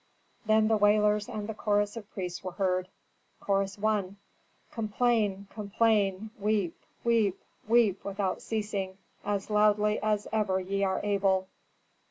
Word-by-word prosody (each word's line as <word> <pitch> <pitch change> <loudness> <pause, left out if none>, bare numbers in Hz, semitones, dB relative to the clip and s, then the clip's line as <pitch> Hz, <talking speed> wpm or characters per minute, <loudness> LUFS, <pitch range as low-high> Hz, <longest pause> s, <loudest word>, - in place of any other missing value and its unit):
Then 215 0 +4
the 220 0 +3
wailers 210 0 +3
and 210 -1 -4
the 220 - -3
chorus 205 0 0
of 215 -3 -8
priests 180 -2 -5
were 185 -1 -5
heard: 185 -1 0 0.5
Chorus 195 0 0
I. 205 -3 0 0.6
"Complain, 215 -3 0
complain, 210 -1 +1
weep, 205 -4 0 0.3
weep, 225 -5 +2 0.3
weep, 220 -4 +3
without 195 -1 -2
ceasing, 205 -4 -3 0.3
as 205 0 -2
loudly 210 0 +3
as 210 -1 0
ever 205 -4 +1
ye 195 +2 -2
are 190 -1 0
able." 195 -2 +1
205 Hz, 130 wpm, -29 LUFS, 195-215 Hz, 0.6 s, Then